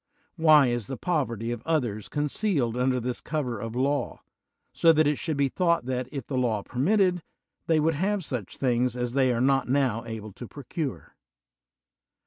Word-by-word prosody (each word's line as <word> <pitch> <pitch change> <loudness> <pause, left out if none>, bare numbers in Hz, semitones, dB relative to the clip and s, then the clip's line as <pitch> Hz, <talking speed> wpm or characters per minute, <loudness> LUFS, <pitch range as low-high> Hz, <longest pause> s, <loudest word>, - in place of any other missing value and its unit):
Why 155 -4 +6
is 120 -4 -1
the 135 - -5
poverty 120 - -1
of 120 -2 -4
others 120 -11 -1
concealed 145 - 0
under 125 0 +1
this 125 +1 -4
cover 135 -8 -3
of 115 +2 -6
law, 140 +3 -1 0.5
so 165 - +5
that 155 -1 +3
it 145 -1 +1
should 160 -4 -2
be 140 -1 +3
thought 170 -1 +1
that, 130 -1 -3
if 135 -5 -5
the 130 -3 -2
law 110 -5 0
permitted, 180 - +1 0.5
they 160 -1 +3
would 160 +2 +2
have 190 +4 -1
such 125 -9 -5
things 125 -1 +1
as 125 -1 -2
they 130 -2 +3
are 120 - 0
not 135 0 +2
now 130 -4 +1
able 110 -2 -7
to 120 - -9
procure? 145 +2 -6
130 Hz, 175 wpm, -26 LUFS, 120-155 Hz, 0.5 s, Why